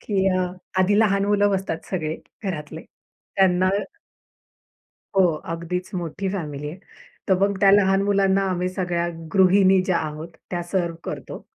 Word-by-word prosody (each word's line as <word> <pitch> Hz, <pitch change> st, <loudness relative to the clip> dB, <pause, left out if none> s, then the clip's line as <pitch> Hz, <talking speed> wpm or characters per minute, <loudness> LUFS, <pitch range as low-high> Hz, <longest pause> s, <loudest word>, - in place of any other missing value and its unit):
की 195 Hz, -2 st, 0 dB
अ, 180 Hz, -, +1 dB, 0.3 s
आधी 205 Hz, +3 st, +3 dB
लहान 200 Hz, -2 st, +3 dB
मुलं 205 Hz, 0 st, +3 dB
बसतात 190 Hz, -4 st, -2 dB
सगळे 160 Hz, -4 st, -2 dB, 0.3 s
घरातले. 160 Hz, -4 st, -5 dB, 0.5 s
त्यांना 185 Hz, -1 st, +4 dB, 1.5 s
हो, 190 Hz, -, +6 dB, 0.3 s
अगदीच 180 Hz, +2 st, -4 dB
मोठी 175 Hz, +2 st, -3 dB
फॅमिली 150 Hz, -6 st, -4 dB
आहे. 170 Hz, -, -8 dB, 0.5 s
तर 190 Hz, -, +5 dB
मग 200 Hz, 0 st, +1 dB
त्या 195 Hz, -1 st, +6 dB
लहान 195 Hz, -1 st, +4 dB
मुलांना 195 Hz, -1 st, +2 dB
आम्ही 180 Hz, 0 st, -1 dB
सगळ्या 175 Hz, -2 st, -1 dB, 0.3 s
गृहिणी 190 Hz, 0 st, +5 dB
ज्या 185 Hz, -2 st, +1 dB
आहोत, 155 Hz, +1 st, -5 dB, 0.2 s
त्या 175 Hz, -1 st, -2 dB
सर्व्ह 170 Hz, -1 st, -2 dB
करतो. -, -, -6 dB
185 Hz, 140 wpm, -23 LUFS, 170-195 Hz, 1.5 s, हो